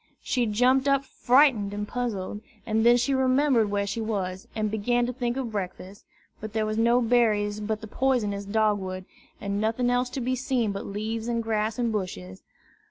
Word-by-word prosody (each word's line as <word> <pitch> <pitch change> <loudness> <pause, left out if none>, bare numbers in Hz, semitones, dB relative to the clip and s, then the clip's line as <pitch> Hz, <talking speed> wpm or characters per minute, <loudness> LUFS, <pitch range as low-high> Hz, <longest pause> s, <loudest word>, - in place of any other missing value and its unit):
She 245 -3 0
jumped 255 +5 +3
up 275 0 +2
frightened 245 -7 +3
and 205 0 -4
puzzled, 210 -5 -3 0.2
and 220 0 +1
then 240 +1 +6
she 250 +3 +1
remembered 260 -3 +3
where 200 0 0
she 200 +3 -3
was, 190 -4 -3
and 215 -1 -1
began 240 +3 +1
to 250 - -3
think 245 0 -2
of 255 -4 -3
breakfast. 190 -1 -6 0.3
But 215 0 -7
there 220 -1 0
were 215 - -2
no 235 +3 +3
berries 215 -3 +2
but 215 +1 -3
the 220 - -7
poisonous 210 -5 0
dog 210 0 +1
wood, 185 -1 -6 0.3
and 200 0 -2
nothing 230 +3 +1
else 245 0 +1
to - - 0
be 255 +1 -1
seen 250 -4 0
but 200 - -5
leaves 220 +3 -4
and 230 -1 -1
grass 220 0 -1
and 240 -2 0
bushes. 95 - -5
220 Hz, 190 wpm, -26 LUFS, 205-245 Hz, 0.3 s, then